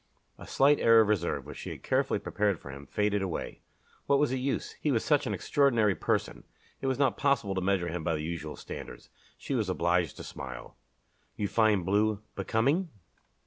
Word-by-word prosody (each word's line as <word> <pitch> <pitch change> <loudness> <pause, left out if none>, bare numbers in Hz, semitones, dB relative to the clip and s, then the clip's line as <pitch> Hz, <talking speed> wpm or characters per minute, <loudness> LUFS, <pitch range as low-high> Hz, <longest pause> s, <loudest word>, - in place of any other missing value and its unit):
A - - -10
slight 145 +2 +4
air 115 0 +6
of 110 - +2
reserve 95 -5 0
which - - -9
she - - -6
had - - -8
carefully - - +1
prepared 100 -4 -1
for 70 - -9
him, 70 0 -10
faded 105 +2 0
away. 95 -4 -4 0.5
What 140 - +4
was 145 -2 +2
the 130 - -1
use? 135 +2 -2
He 150 - +1
was 115 -4 0
such 150 -3 +2
an - - -1
extraordinary 120 -8 +2
person! - - -2 0.4
It 135 - -2
was 130 -1 0
not 140 -1 +2
possible 135 -9 +1
to 95 - -1
measure 95 -2 +1
him 85 -1 -4
by 85 -1 0
the 75 - -4
usual 80 -2 -5
standards. - - -9 0.3
She - - -5
was 110 -7 0
obliged 85 -4 +1
to - - -7
smile. 65 -2 -8 0.6
"You 105 - -1
find 105 -4 +2
blue 105 +2 +1
becoming?" 135 - +1
105 Hz, 195 wpm, -29 LUFS, 90-130 Hz, 0.6 s, air